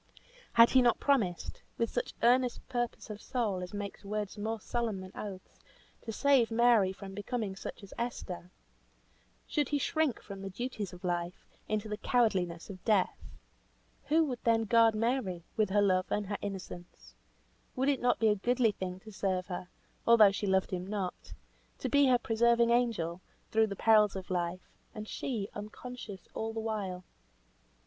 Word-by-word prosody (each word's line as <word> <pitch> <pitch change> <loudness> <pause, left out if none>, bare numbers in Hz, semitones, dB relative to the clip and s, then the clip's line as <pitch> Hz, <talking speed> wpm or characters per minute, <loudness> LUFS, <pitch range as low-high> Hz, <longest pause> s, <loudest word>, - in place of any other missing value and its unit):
Had 230 0 +7
he 260 - +6
not 240 -2 +3
promised 220 -12 0 0.2
with 230 -1 0
such 245 - -3
earnest 245 +1 +3
purpose 240 -3 -3
of 210 0 -8
soul, 215 -8 -1
as 180 - -6
makes 205 0 -6
words 205 0 -3
more 220 +2 -3
solemn 230 -2 -2
than 185 0 -9
oaths, 195 -3 -8 0.4
to 225 - -5
save 265 0 +3
Mary 230 -4 +4
from 195 0 -9
becoming 205 0 -3
such 195 - -8
as 200 - -11
Esther? 185 -7 -4 1.0
Should 295 -3 0
he 295 - +1
shrink 305 -1 0
from 195 -2 -9
the 195 - -5
duties 215 0 -4
of 180 +1 -12
life, 175 0 -2 0.2
into 215 0 -1
the 210 0 -3
cowardliness 190 -9 +1
of 185 -3 -10
death? 205 -5 +2 0.9
Who 320 +2 +4
would 250 -5 -5
then 225 -1 +3
guard 225 0 +5
Mary, 215 -6 -1
with 215 -3 +2
her 205 +1 +3
love 185 -2 +2
and 210 - 0
her 200 +1 -3
innocence? 190 -3 -8 0.6
Would 265 +2 0
it 280 -2 +2
not 245 0 +3
be 225 - +3
a 210 - +3
goodly 235 +2 +2
thing 185 -2 -5
to 215 - -11
serve 190 -2 -1
her, 180 -1 -5 0.4
although 220 -4 +8
she 200 +1 -3
loved 190 0 +2
him 185 0 -3
not; 195 -3 -4 0.5
to - - -3
be 285 -1 +5
her 250 -1 +5
preserving 235 0 +3
angel, 210 -8 +1 0.3
through 220 0 +4
the 200 - -5
perils 210 -1 +4
of 190 -1 -6
life; 175 0 -2 0.3
and 215 0 -6
she, 220 -6 -3
unconscious 210 -1 -8
all 225 0 -3
the 225 - -3
while? 205 -5 -3
215 Hz, 170 wpm, -31 LUFS, 190-235 Hz, 1.0 s, although